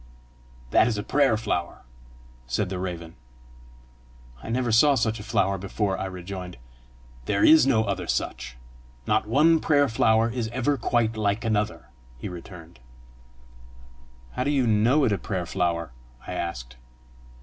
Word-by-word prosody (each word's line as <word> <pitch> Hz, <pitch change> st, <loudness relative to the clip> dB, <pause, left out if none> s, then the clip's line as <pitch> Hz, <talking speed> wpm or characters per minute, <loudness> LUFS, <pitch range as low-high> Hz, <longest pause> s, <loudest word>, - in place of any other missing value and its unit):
"That -, -, +5 dB
is 115 Hz, -3 st, -1 dB
a 105 Hz, -, -3 dB
prayer 140 Hz, -6 st, +2 dB
flower," 95 Hz, -6 st, -3 dB, 0.6 s
said 90 Hz, +10 st, -1 dB
the 95 Hz, -1 st, -4 dB
raven. 85 Hz, -3 st, -6 dB, 1.3 s
"I -, -, -9 dB
never 120 Hz, 0 st, 0 dB
saw 140 Hz, +6 st, +5 dB
such 115 Hz, -2 st, 0 dB
a -, -, -8 dB
flower 95 Hz, -2 st, 0 dB
before!" 100 Hz, +1 st, -2 dB
I 95 Hz, -, -4 dB
rejoined. 90 Hz, -2 st, -7 dB, 0.7 s
"There 100 Hz, +6 st, 0 dB
is 155 Hz, -4 st, +7 dB
no 115 Hz, -5 st, +3 dB
other 95 Hz, -4 st, -3 dB
such. -, -, -3 dB, 0.5 s
Not 105 Hz, 0 st, +1 dB
one 155 Hz, +8 st, +4 dB
prayer 145 Hz, -2 st, +3 dB
flower 110 Hz, 0 st, +2 dB
is 120 Hz, -1 st, -3 dB
ever 130 Hz, +5 st, 0 dB
quite 115 Hz, -4 st, 0 dB
like 105 Hz, +1 st, -1 dB
another," 110 Hz, -1 st, -1 dB, 0.3 s
he -, -, -6 dB
returned. 85 Hz, -4 st, -11 dB, 1.5 s
"How 125 Hz, -, -2 dB
do 140 Hz, -, -1 dB
you 140 Hz, -3 st, +2 dB
know 115 Hz, +7 st, +3 dB
it 120 Hz, -, +2 dB
a 100 Hz, -, 0 dB
prayer 95 Hz, -4 st, -3 dB
flower?" 85 Hz, -4 st, -2 dB, 0.3 s
I 90 Hz, -, -6 dB
asked. -, -, -5 dB
105 Hz, 150 wpm, -25 LUFS, 90-120 Hz, 1.5 s, is